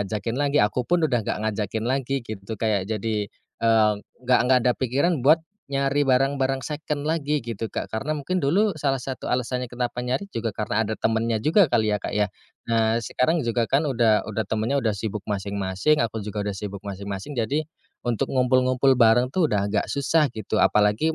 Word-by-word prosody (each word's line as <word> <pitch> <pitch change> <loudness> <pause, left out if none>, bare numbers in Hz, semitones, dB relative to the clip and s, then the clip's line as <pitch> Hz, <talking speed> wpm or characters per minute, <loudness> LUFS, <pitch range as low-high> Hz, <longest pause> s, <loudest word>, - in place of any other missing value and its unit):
ngajakin 110 +3 -3
lagi, 145 0 +1
aku 105 +4 +1
pun 175 -1 +3
udah 125 -6 +1
nggak - - -2
ngajakin 110 +1 -2
lagi 135 +1 -1
gitu. 110 -1 -7
Kayak 105 -4 0
jadi, 110 -1 -2 0.3
eee, 110 -2 +4 0.3
nggak 125 0 +4
nggak 130 -1 +6
ada 125 - +4
pikiran 140 +5 +1
buat 155 +3 +6 0.3
nyari 140 +1 +1
barang-barang 135 -1 +1
second 150 -1 -4
lagi 150 -2 0
gitu, 115 -1 -4
Kak. - - -3
Karena 135 +7 -3
mungkin 180 +5 -2
dulu 190 +8 +2
salah 135 -3 0
satu 130 +1 -5
alasannya 125 0 -1
kenapa 125 0 -3
nyari 130 +10 -2
juga, 115 0 -1
karena 105 +1 -1
ada 110 0 -4
temennya 115 0 +1
juga 160 - +3
kali 110 -3 +2
ya, 105 - -3
Kak, - - -3
ya. 105 0 +1 0.4
Nah 115 0 +2
sekarang 125 +8 0
juga 115 0 0
kan 150 +3 +2
udah 115 -5 +2
udah 110 0 -2
temennya 115 +6 0
udah 110 - +2
sibuk 105 0 -4
masing-masing, 100 +7 0
aku 115 -1 -2
juga 105 0 -3
udah 100 -1 -3
sibuk 100 -1 -6
masing-masing, 100 +6 -6
jadi 140 +7 0 0.4
untuk 120 -3 -1
ngumpul-ngumpul 130 +1 +3
bareng 120 +2 +5
tuh 170 +2 +2
udah 100 -4 0
agak 105 - 0
susah 150 +2 +2
gitu, 110 0 -2
apalagi 105 +10 +3
120 Hz, 185 wpm, -24 LUFS, 110-140 Hz, 0.4 s, nggak